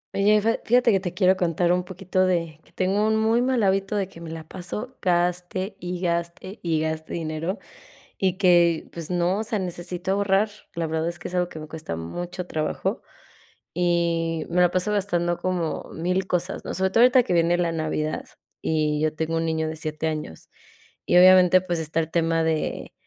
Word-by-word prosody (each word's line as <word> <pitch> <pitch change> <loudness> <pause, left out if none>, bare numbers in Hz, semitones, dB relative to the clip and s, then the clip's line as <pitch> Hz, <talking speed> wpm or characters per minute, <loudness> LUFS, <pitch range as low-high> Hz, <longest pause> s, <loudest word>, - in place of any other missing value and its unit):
Oye, 210 +2 +4
fe 225 +1 +1
fíjate 245 0 +4
que 195 - +3
te 180 -2 -5
quiero 185 0 +4
contar 175 -1 +1
un 180 0 0
poquito 185 0 -1
de 165 -4 -1
que - - -25
tengo 195 +3 +1
un 220 0 +2
muy 225 +2 +2
mal 250 -2 +1
hábito 195 +1 +1
de 200 -2 0
que 170 -3 -13
me 165 - -7
la 160 -1 -8
paso, 210 +10 -6
gaste 180 +2 0
y 180 0 -5
gaste 170 +3 -3
y 165 -2 0
gaste 160 0 -3
dinero 165 +4 -3 0.6
y 190 -2 +1
que 175 -4 +3
pues 165 -2 -7
no, 180 +2 +1
o - - -1
sea, 220 0 -1
necesito 180 0 -4
ahorrar. 200 +1 +2 0.3
La 165 0 -1
verdad, 160 0 -1
es 170 0 -3
que 175 - -7
es - - -11
algo 180 0 +1
que 160 - -9
me 155 0 -9
cuesta 160 - -5
mucho 175 - -5
trabajo 155 -3 -2 0.7
y 170 -2 0
me 175 +1 +1
la 175 -1 +4
paso 185 +4 0
gastando 175 -4 0
como 180 -3 -3
1000 180 +3 -1
cosas, 180 0 -2
¿no?, - - -4
sobre 190 0 +1
todo 225 +5 +3
ahorita 255 +1 +6
que 230 - -2
viene 170 0 +3
la 170 -1 +1
Navidad, 155 -1 -2 0.3
y 155 -1 0
yo 155 0 +1
tengo 160 +1 -2
un 165 - 0
niño 160 -1 -1
de 160 - -4
7 155 0 -3
años 155 - -5 0.6
y - - +3
obviamente, 185 0 +7
pues 175 -1 -2
está 160 0 -2
el 160 - -4
tema 165 -1 +1
de, 160 -1 -2
175 Hz, 200 wpm, -24 LUFS, 165-190 Hz, 0.7 s, obviamente